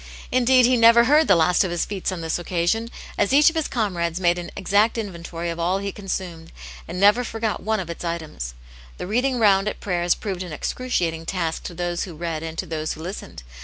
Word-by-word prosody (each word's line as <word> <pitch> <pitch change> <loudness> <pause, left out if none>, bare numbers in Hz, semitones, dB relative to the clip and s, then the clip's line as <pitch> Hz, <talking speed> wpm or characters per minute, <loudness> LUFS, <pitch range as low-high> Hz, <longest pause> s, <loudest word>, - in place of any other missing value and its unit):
Indeed, 255 0 +5
he 250 +1 +3
never 230 +1 +7
heard 295 +5 +4
the 195 - +6
last 170 +2 +3
o^ 190 - +1
his 175 0 -1
feats 195 -2 -3
on 180 -2 -5
this 160 +1 -2
occasion, 175 +6 -1 0.3
as - - +2
each 295 +3 +6
of - - -15
his 320 -2 0
comrades 175 -7 -1
made 175 -1 +2
an 175 - -6
exact 205 +5 +2
inventory 170 -5 -5
of 165 - -6
all 175 +3 +1
he 200 0 -3
consumed, 180 -5 -6 0.4
ancP 170 - -5
never 205 +6 +4
forgot 225 -2 -3
one 220 0 0
of 185 - -4
its 170 +1 -7
items. 160 - -5 0.4
The - - -5
"reading 250 +6 0
round" 200 -3 +4
at - - -3
prayers 175 -3 0
proved 190 -4 -5
an 180 -4 -6
excruciating 165 -5 -2
task 170 -4 -2
to 175 - -6
those 175 0 -2
who 175 -4 -9
read 165 -1 -4
and 160 0 -6
to 190 - -2
those 155 -2 -3
who 160 - -10
listened. 180 - -7
185 Hz, 220 wpm, -23 LUFS, 170-220 Hz, 0.4 s, never